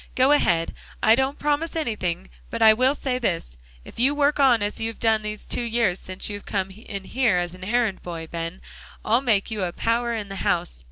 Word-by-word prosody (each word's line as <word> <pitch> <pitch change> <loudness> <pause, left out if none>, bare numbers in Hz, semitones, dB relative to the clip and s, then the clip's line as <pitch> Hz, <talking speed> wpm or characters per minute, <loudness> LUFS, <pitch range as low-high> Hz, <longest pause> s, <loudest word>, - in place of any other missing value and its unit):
"Go 260 +2 +4
ahead. 170 - +2 0.3
I 220 - +7
don't 265 +4 +1
promise 295 +3 -1
anything, 190 - -2 0.2
but 230 - -4
I 220 0 +9
will 255 +5 +2
say 255 -3 -2
this. 170 - -2 0.3
If - - -12
you 270 +4 +3
work 290 0 +2
on 250 -6 +5
as 205 +2 -2
you 225 - 0
have 225 - -6
done 220 -1 +2
these 210 0 -6
two - - 0
years 230 -6 +1
since 185 0 -4
you 205 -1 -5
came 195 -2 -2
in 200 -1 -8
here 230 -3 +1
as 175 0 -1
errand 205 +2 -1
boy, 165 -2 -6
Ben, 165 +2 -5 0.4
I'll 230 +4 +3
make 225 -5 +1
you 215 -2 -3
a 180 -2 -1
power 235 +5 0
in 210 -2 -4
the 195 0 -7
house. - - -1
220 Hz, 215 wpm, -24 LUFS, 185-250 Hz, 0.4 s, I